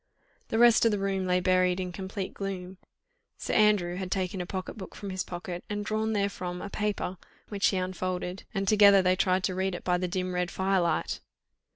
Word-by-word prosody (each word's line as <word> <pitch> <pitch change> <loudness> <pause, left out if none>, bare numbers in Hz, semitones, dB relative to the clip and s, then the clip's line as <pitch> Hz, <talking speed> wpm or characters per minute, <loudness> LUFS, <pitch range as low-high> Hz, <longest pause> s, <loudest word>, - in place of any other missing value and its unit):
The 225 - -1
rest 235 -1 +6
of 230 - +5
the 210 - 0
room 195 -1 -1
lay 180 0 +3
buried 185 0 +2
in 180 -1 -3
complete 190 +2 -5
gloom; 190 -2 -5 0.6
Sir - - -3
Andrew 205 -5 +3
had 190 -1 -4
taken 185 0 -1
a 175 - -5
pocket 185 0 -4
book 195 -4 -9
from 200 -2 -6
his 185 0 -2
pocket, 175 0 -6
and 205 0 -3
drawn 220 +1 -1
therefrom 190 -3 -2
a 200 - -7
paper, 210 -3 -2 0.3
which 200 -2 +1
he 195 - +1
unfolded, 185 0 -3
and 195 -1 -2
together 200 -2 +7
they 185 0 +3
tried 185 0 +1
to 185 - 0
read 190 0 -1
it - - -7
by 180 -1 +1
the 180 - -1
dim 185 0 -2
red 180 0 0
firelight. 190 -4 0
190 Hz, 205 wpm, -28 LUFS, 180-200 Hz, 0.6 s, together